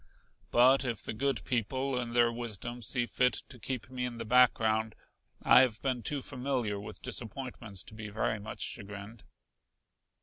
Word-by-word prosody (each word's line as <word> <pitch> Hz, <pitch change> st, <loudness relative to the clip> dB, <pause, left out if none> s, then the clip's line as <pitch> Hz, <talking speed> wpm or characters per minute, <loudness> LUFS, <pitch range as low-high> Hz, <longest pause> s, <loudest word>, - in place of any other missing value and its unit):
But 130 Hz, +3 st, +6 dB
if 120 Hz, -4 st, -2 dB
the -, -, -4 dB
good 135 Hz, +2 st, -1 dB
people 130 Hz, +3 st, -1 dB
in 120 Hz, -1 st, -4 dB
their 120 Hz, -1 st, +5 dB
wisdom 120 Hz, 0 st, -5 dB
see 120 Hz, +2 st, 0 dB
fit 125 Hz, +1 st, +2 dB, 0.2 s
to 125 Hz, -, -9 dB
keep 120 Hz, -3 st, -3 dB
me 125 Hz, -1 st, -3 dB
in 125 Hz, -1 st, -3 dB
the 115 Hz, -, -5 dB
background 110 Hz, -2 st, +3 dB, 0.5 s
I -, -, +8 dB
have 120 Hz, -4 st, +1 dB
been 130 Hz, -3 st, 0 dB
too 140 Hz, +4 st, -2 dB
familiar 125 Hz, -6 st, -2 dB
with 105 Hz, -, -9 dB
disappointments 115 Hz, -4 st, -5 dB
to -, -, -12 dB
be 110 Hz, -1 st, -7 dB
very 110 Hz, +1 st, -1 dB
much 105 Hz, +1 st, -7 dB
chagrined." 105 Hz, +1 st, -5 dB
120 Hz, 165 wpm, -31 LUFS, 110-125 Hz, 0.5 s, I